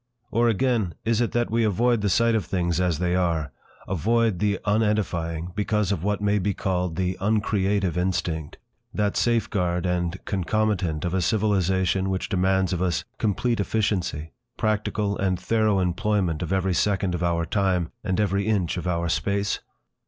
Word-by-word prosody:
Or, 120 Hz, 0 st, +3 dB
again, 115 Hz, -5 st, +1 dB
is 115 Hz, 0 st, +2 dB
it 120 Hz, -, 0 dB
that 120 Hz, -1 st, 0 dB
we 115 Hz, +1 st, +2 dB
avoid 115 Hz, +2 st, +2 dB
the 100 Hz, -, +1 dB
sight 115 Hz, +5 st, +3 dB
of 110 Hz, -5 st, 0 dB
things 85 Hz, -1 st, 0 dB
as 90 Hz, -4 st, +1 dB
they 90 Hz, +1 st, 0 dB
are, 85 Hz, -5 st, 0 dB, 0.4 s
avoid 110 Hz, +2 st, +1 dB
the 105 Hz, -2 st, +1 dB
unedifying, 95 Hz, -6 st, 0 dB
because 105 Hz, -1 st, 0 dB
of 90 Hz, -4 st, -2 dB
what 105 Hz, 0 st, -1 dB
may 105 Hz, 0 st, +2 dB
be 100 Hz, 0 st, -1 dB
called 90 Hz, -3 st, -1 dB
"the 90 Hz, +1 st, -1 dB
uncreative 100 Hz, -3 st, +1 dB
instinct," 90 Hz, -4 st, -2 dB, 0.4 s
that 105 Hz, -1 st, 0 dB
safeguard 100 Hz, -7 st, +1 dB
and 90 Hz, 0 st, -1 dB
concomitant 95 Hz, -4 st, 0 dB
of 85 Hz, -, -2 dB
a 95 Hz, -, +1 dB
civilisation 95 Hz, -2 st, +1 dB
which 95 Hz, -1 st, -2 dB
demands 95 Hz, 0 st, +1 dB
of 90 Hz, -, -2 dB
us 90 Hz, -3 st, 0 dB, 0.2 s
complete 115 Hz, +3 st, 0 dB
efficiency, 95 Hz, -7 st, -1 dB, 0.3 s
practical 105 Hz, -1 st, -1 dB
and 95 Hz, -2 st, 0 dB
thorough 110 Hz, -3 st, +2 dB
employment 95 Hz, -2 st, 0 dB
of 90 Hz, -, -3 dB
every 95 Hz, -1 st, +1 dB
second 95 Hz, 0 st, +1 dB
of 90 Hz, -, -3 dB
our 85 Hz, -1 st, +1 dB
time 90 Hz, -2 st, 0 dB
and 95 Hz, -1 st, -1 dB
every 100 Hz, 0 st, +1 dB
inch 95 Hz, -6 st, 0 dB
of 90 Hz, -, -4 dB
our 85 Hz, -1 st, 0 dB
space? 100 Hz, +4 st, 0 dB
95 Hz, 165 wpm, -25 LUFS, 90-105 Hz, 0.4 s, Or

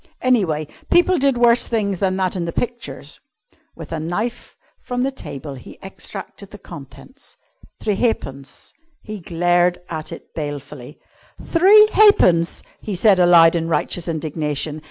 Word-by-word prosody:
Anyway, 185 Hz, -, +1 dB, 0.2 s
people 350 Hz, +1 st, +3 dB
did 270 Hz, -2 st, +2 dB
worse 240 Hz, 0 st, +4 dB
things 200 Hz, -5 st, -1 dB
than 190 Hz, -1 st, 0 dB
that 190 Hz, -1 st, -1 dB
in 175 Hz, -2 st, -2 dB
the 170 Hz, -, -3 dB
pictures. 240 Hz, +5 st, -5 dB, 0.6 s
With -, -, -10 dB
a 165 Hz, -, -3 dB
knife 210 Hz, +10 st, -4 dB, 0.3 s
from 245 Hz, 0 st, -3 dB
the 270 Hz, -, 0 dB
table 140 Hz, -, -8 dB
he 130 Hz, -, -12 dB
extracted 195 Hz, +1 st, -10 dB
the 205 Hz, -, -11 dB
contents 175 Hz, -, -13 dB, 0.4 s
three 210 Hz, -, -1 dB
halfpence! 140 Hz, -, -3 dB, 0.3 s
He 215 Hz, -2 st, -7 dB
glared 175 Hz, +1 st, +1 dB
at 155 Hz, 0 st, -5 dB
it 165 Hz, -, -11 dB
balefully. 145 Hz, -2 st, -7 dB, 0.4 s
"Three 405 Hz, +5 st, +5 dB
halfpence!" 180 Hz, -, +4 dB, 0.2 s
he 205 Hz, -, -4 dB
said 195 Hz, 0 st, +4 dB
aloud 170 Hz, -2 st, +6 dB
in 165 Hz, -1 st, -1 dB
righteous 170 Hz, +1 st, -2 dB
indignation. 155 Hz, -2 st, -3 dB
180 Hz, 140 wpm, -20 LUFS, 160-235 Hz, 0.6 s, aloud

